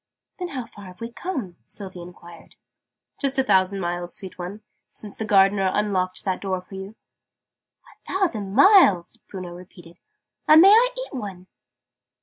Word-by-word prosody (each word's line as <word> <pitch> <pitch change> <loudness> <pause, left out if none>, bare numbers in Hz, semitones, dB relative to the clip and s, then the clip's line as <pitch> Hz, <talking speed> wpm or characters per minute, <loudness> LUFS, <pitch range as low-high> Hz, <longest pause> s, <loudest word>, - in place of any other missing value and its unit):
"Then 360 - -3
how 260 -7 -6
far 205 -3 -14
have 180 +1 -13
we 230 0 -6
come?" 240 - -5
Sylvie 190 -3 -9
enquired. 175 -1 -14 0.6
"Just 275 -2 -1
a 265 - +3
thousand 195 -2 +2
miles, 175 0 -3
sweet 190 -2 -6
one, 185 +4 -7 0.3
since 210 -2 -10
the 220 - -5
Gardener 195 -1 +3
unlocked 185 -3 -1
that 190 -2 -2
door 190 -2 -2
for 185 +2 -16
you." 190 +2 -8 0.9
"A - - -14
thousand 220 - -1
miles!" 280 - +5
Bruno 185 -3 -9
repeated. 175 -1 -14 0.5
"And 310 +1 +8
may 385 +4 +8
I 480 +3 +5 0.2
eat - - -16
one?" 195 -8 -7
195 Hz, 155 wpm, -23 LUFS, 185-235 Hz, 0.9 s, And